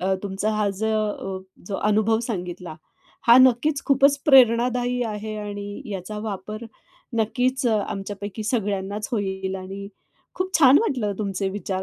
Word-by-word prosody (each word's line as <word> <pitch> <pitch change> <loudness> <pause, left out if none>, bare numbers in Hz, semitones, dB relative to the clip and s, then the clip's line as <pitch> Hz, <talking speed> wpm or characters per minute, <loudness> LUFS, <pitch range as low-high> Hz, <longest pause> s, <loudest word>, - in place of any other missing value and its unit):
अ, 190 +1 +1
तुमचा 200 +1 -2
हा 210 -1 +1
जो, 210 -2 -2 0.3
जो 200 - -4
अनुभव 215 +1 +2
सांगितला, 180 -7 -5 0.5
हा 235 - +8
नक्कीच 260 +3 +4
खूपच 280 +1 +4
प्रेरणादायी 245 -1 +4
आहे 215 -1 -4
आणि 205 -1 -6
याचा 195 +3 -5
वापर 210 +3 -6 0.5
नक्कीच 255 +4 0
अ, 220 -2 +3
आमच्यापैकी 205 +2 -5
सगळ्यांनाच 205 -2 -2
होईल 190 -3 -2
आणि 195 +1 -7 0.5
खूप 370 0 -2
छान 275 -2 +7
वाटलं 245 - -1
तुमचे 195 -2 -2
विचार 190 -1 -3
210 Hz, 130 wpm, -23 LUFS, 195-240 Hz, 0.5 s, हा